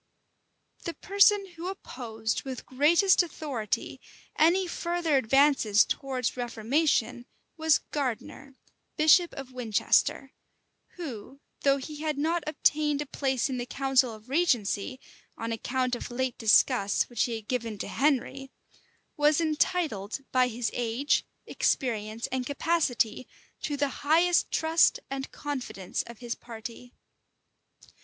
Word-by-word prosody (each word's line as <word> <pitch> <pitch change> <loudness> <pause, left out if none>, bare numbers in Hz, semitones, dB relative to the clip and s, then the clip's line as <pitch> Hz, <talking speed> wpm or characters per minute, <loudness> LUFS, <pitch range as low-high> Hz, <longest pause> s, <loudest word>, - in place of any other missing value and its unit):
The 335 - -4
person 400 +1 +4
who 340 0 -8
opposed 225 - -4
with 260 -2 -7
greatest 335 +10 +4
authority 285 - -4 0.3
any 350 +4 +4
further 345 -3 -1
advances 265 -4 +4
towards 260 -3 -2
reformation, 245 0 0 0.3
was 320 -2 +3
Gardiner, 265 0 -4 0.4
bishop 315 +3 +5
of 265 -2 -8
Winchester; 250 +3 +1 0.6
who, 275 - -8 0.2
though 275 -1 +3
he 295 +3 -7
had 305 -1 -2
not 325 +3 0
obtained 295 -1 +1
a - - -14
place 265 -3 -1
in 260 -2 -3
the 245 - -3
council 265 -1 +2
of 215 +1 -12
regency, 255 - 0 0.4
on 230 0 -4
account 255 +2 -1
of 240 - -3
late 255 0 -2
disgusts 220 -2 +3
which 240 -3 0
he 235 - -3
had 220 -2 -8
given 230 -4 -3
to - - -5
Henry, 270 0 0 0.7
was 295 +1 +4
entitled, 305 - 0
by 255 -1 +4
his 240 0 -3
age, 245 +5 0 0.2
experience, 225 -4 -1
and 255 -1 -2
capacity, 285 -6 0 0.3
to 290 -1 -3
the 285 0 +1
highest 335 +4 +3
trust 325 +1 +3
and 270 0 -4
confidence 255 -10 -4
of 235 -1 -10
his 240 0 -4
party. 235 +1 -10
265 Hz, 125 wpm, -28 LUFS, 235-305 Hz, 0.7 s, bishop